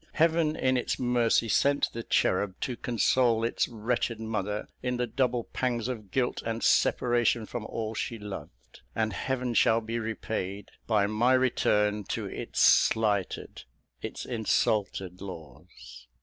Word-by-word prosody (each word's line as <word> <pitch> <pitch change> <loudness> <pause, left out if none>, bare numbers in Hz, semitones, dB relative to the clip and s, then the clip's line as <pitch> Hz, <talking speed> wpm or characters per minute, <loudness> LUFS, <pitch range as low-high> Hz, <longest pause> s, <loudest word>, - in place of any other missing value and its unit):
Heaven, 165 -1 +2
in 130 -3 +1
its 125 - -1
mercy, 120 -2 +2
sent 140 +5 +2
the 115 - -4
cherub 95 -3 +1
to 125 - -2
console 120 0 +2
its 115 - 0
wretched 115 0 -2
mother 105 -2 -3
in 125 -1 -1
the 125 - 0
double 125 0 0
pangs 120 -3 -1
of 110 -6 -5
guilt 125 +4 -1
and 115 0 -3
separation 120 -2 +2
from 110 0 -6
all 110 -1 -4
she 115 +1 -3
loved; 95 - -10
and 110 -1 0
Heaven 125 +4 -2
shall 115 0 +4
be 115 +1 -4
repaid, 105 -3 -4 0.2
by 105 -3 +3
my 110 +5 +2
return 105 -5 +2
to - - -3
its - - -5
slighted, 105 -4 +2 0.4
its - - -6
insulted 105 -5 0
laws. 65 -8 -11
115 Hz, 140 wpm, -28 LUFS, 105-125 Hz, 0.4 s, shall